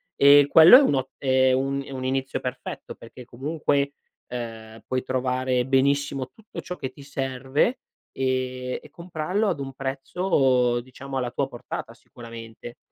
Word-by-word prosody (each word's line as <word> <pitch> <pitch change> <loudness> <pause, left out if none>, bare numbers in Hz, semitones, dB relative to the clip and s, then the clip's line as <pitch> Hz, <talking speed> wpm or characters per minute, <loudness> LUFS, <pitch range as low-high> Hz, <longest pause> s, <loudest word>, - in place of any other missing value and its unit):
E 140 0 +7
quello 165 +10 +9
è - - +7
un 270 - +2
o 130 -1 -1
è 130 -1 +3
un 135 +1 0
un 130 -1 -5
inizio 135 +1 -1
perfetto, 125 0 -6
perché 120 +2 -13
comunque, 140 +2 -1 0.4
uhm, 115 -2 -7
puoi 130 0 -1
trovare 130 -1 0
benissimo 135 0 +1
tutto 220 -1 -9
ciò 180 - -6
che 130 - -5
ti - - -15
serve, 135 - -1 0.3
ehm, 130 -1 -2
e 150 - -16
comprarlo 180 +5 -2
ad 170 -7 -2
un 135 -1 -5
prezzo 135 -2 +1
diciamo 135 +2 -8
alla 125 -2 -2
tua 135 +2 -1
portata, 120 -2 -7
sicuramente. 115 -1 -11
130 Hz, 150 wpm, -24 LUFS, 125-140 Hz, 0.4 s, quello